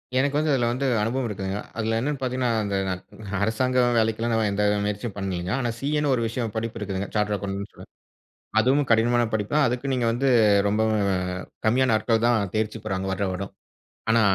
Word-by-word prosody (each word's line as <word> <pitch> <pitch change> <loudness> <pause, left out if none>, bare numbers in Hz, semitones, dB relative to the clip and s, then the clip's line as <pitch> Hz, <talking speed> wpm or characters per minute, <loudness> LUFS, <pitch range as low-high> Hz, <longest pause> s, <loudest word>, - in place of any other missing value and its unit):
எனக்கு 140 +2 +2
வந்து 155 0 +1
அதுல 120 -3 +2
வந்து 130 +3 -2 0.2
அனுபவம் 125 +4 -1
இருக்குங்க. 95 -2 -4 0.2
அதுல 110 0 0
என்னென்னு 140 +3 -2
பார்த்தீங்கன்னா 125 -1 0
இந்த 100 -1 -2 0.7
அரசாங்க 125 +4 +1 0.2
வேலைக்கெல்லாம் 115 +1 +1
நான் 110 -2 +2
எந்த 100 +1 0 0.2
முயற்சியும் 105 +1 -3
பண்ணலங்க. 95 -2 -3
ஆனா 120 -3 -1
சி.ஏனு 150 0 0
ஒரு 120 - +1
விஷயம் 115 -1 -3
படிப்பு 115 0 -3
இருக்குதுங்க 100 -1 -3
சார்டர்ட் 105 -1 +1
அக்கவுண்ட். 100 +1 -6 0.8
அதுவும் 135 +4 +2
கடினமான 120 +1 +3
படிப்புதான் 110 +7 +2
அதுக்கு 125 +3 -2
நீங்க 125 -2 +1
வந்து 130 +4 +1 0.4
ரொம்பவும் 110 0 +1 0.6
கம்மியான 125 +1 +3
ஆட்கள் 115 +1 +1
தான் 110 -5 +2
தேர்ச்சி 110 0 -1
பெறாங்க 95 -2 -2
வருடா 95 +1 -1
வருடம். 95 +2 -5 0.6
ஆனா 115 0 +4
115 Hz, 165 wpm, -25 LUFS, 105-125 Hz, 0.8 s, ஆனா